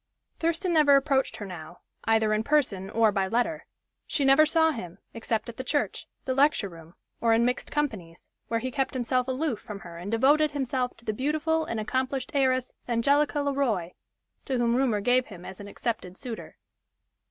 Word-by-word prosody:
Thurston 335 Hz, +2 st, 0 dB
never 295 Hz, -3 st, +6 dB
approached 275 Hz, -1 st, +2 dB
her 205 Hz, -, -6 dB
now, 175 Hz, -2 st, -9 dB, 0.2 s
either 220 Hz, -1 st, +3 dB
in 215 Hz, +1 st, +1 dB
person 225 Hz, -10 st, +1 dB
or 225 Hz, 0 st, +3 dB
by 195 Hz, -2 st, 0 dB
letter. 245 Hz, +9 st, -1 dB, 0.4 s
She 280 Hz, -, 0 dB
never 275 Hz, +3 st, +6 dB
saw 320 Hz, 0 st, +3 dB
him, 180 Hz, -, -7 dB, 0.2 s
except 225 Hz, -1 st, -2 dB
at 235 Hz, -, -8 dB
the 260 Hz, -, -4 dB
church, 290 Hz, +3 st, -1 dB, 0.2 s
the 260 Hz, -, 0 dB
lecture 270 Hz, -6 st, +3 dB
room, 165 Hz, 0 st, -14 dB, 0.3 s
or 230 Hz, -1 st, +4 dB
in 235 Hz, +1 st, +3 dB
mixed 250 Hz, 0 st, -1 dB
companies, 210 Hz, -, -3 dB, 0.2 s
where 230 Hz, -, 0 dB
he 255 Hz, -, -3 dB
kept 270 Hz, 0 st, -1 dB
himself 250 Hz, 0 st, 0 dB
aloof 260 Hz, -2 st, -1 dB
from 205 Hz, -2 st, -8 dB
her 170 Hz, -1 st, -9 dB
and 180 Hz, +4 st, -6 dB
devoted 285 Hz, +7 st, +4 dB
himself 260 Hz, -3 st, -2 dB
to 230 Hz, -, -18 dB
the 215 Hz, -, -1 dB
beautiful 310 Hz, +6 st, 0 dB
and 230 Hz, -, -3 dB
accomplished 260 Hz, +3 st, -2 dB
heiress 260 Hz, -2 st, +2 dB, 0.2 s
Angelica 285 Hz, +5 st, +2 dB
Le 285 Hz, 0 st, 0 dB
Roy, 215 Hz, -11 st, 0 dB, 0.5 s
to 265 Hz, -, -1 dB
whom 235 Hz, -1 st, +2 dB
rumor 245 Hz, -5 st, +2 dB
gave 250 Hz, +4 st, +3 dB
him 180 Hz, -4 st, -11 dB
as 190 Hz, -, -9 dB
an 205 Hz, -, -8 dB
accepted 200 Hz, -4 st, -4 dB
suitor. 240 Hz, -4 st, -7 dB
250 Hz, 185 wpm, -27 LUFS, 215-280 Hz, 0.5 s, never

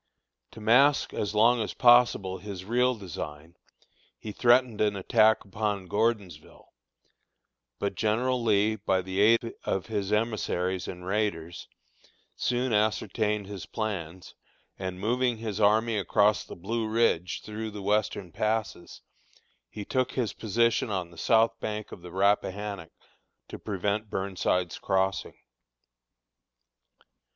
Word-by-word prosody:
To -, -, -11 dB
mask 130 Hz, +7 st, +4 dB
as 105 Hz, 0 st, -3 dB
long 115 Hz, +3 st, +4 dB
as 105 Hz, -, -4 dB
possible 120 Hz, -6 st, +4 dB
his 100 Hz, -3 st, -8 dB
real 125 Hz, +3 st, +2 dB
design, 80 Hz, -5 st, -8 dB, 0.6 s
he 110 Hz, -, -7 dB
threatened 120 Hz, 0 st, +3 dB
an 105 Hz, -1 st, +2 dB
attack 110 Hz, +3 st, +3 dB
upon 100 Hz, -1 st, -2 dB
Gordonsville; 105 Hz, -1 st, -3 dB, 1.0 s
but 100 Hz, -, -2 dB
General 120 Hz, +5 st, 0 dB
Lee, 110 Hz, -1 st, +2 dB
by 95 Hz, -2 st, 0 dB
the 95 Hz, +1 st, -4 dB
aid 115 Hz, +2 st, +4 dB
of 95 Hz, -, -2 dB
his 105 Hz, -3 st, -3 dB
emissaries 100 Hz, -4 st, -1 dB
and 90 Hz, 0 st, -8 dB
raiders, 95 Hz, -5 st, -2 dB, 0.7 s
soon 125 Hz, 0 st, -1 dB
ascertained 105 Hz, 0 st, 0 dB
his 95 Hz, -4 st, -8 dB
plans, 95 Hz, -6 st, -5 dB, 0.4 s
and 95 Hz, -1 st, -5 dB
moving 120 Hz, +3 st, 0 dB
his 110 Hz, -2 st, -5 dB
army 110 Hz, +1 st, +3 dB
across 105 Hz, +1 st, +2 dB
the -, -, -9 dB
Blue 110 Hz, +5 st, -3 dB
Ridge, 110 Hz, -6 st, +1 dB
through 110 Hz, +1 st, -5 dB
the 105 Hz, -2 st, -8 dB
western 100 Hz, -3 st, -1 dB
passes, 110 Hz, -3 st, -3 dB, 0.7 s
he 105 Hz, -, -7 dB
took 130 Hz, +2 st, -1 dB
his 115 Hz, -6 st, -1 dB
position 115 Hz, +2 st, +1 dB
on 90 Hz, -4 st, -3 dB
the -, -, -15 dB
south 115 Hz, +4 st, +2 dB
bank 105 Hz, -1 st, -5 dB
of -, -, -10 dB
the 90 Hz, 0 st, -10 dB
Rappahannock, 100 Hz, -1 st, 0 dB, 0.6 s
to -, -, -8 dB
prevent 105 Hz, +1 st, -2 dB
Burnside's 90 Hz, -2 st, -1 dB
crossing. 95 Hz, -1 st, -1 dB
105 Hz, 125 wpm, -27 LUFS, 95-115 Hz, 1.0 s, mask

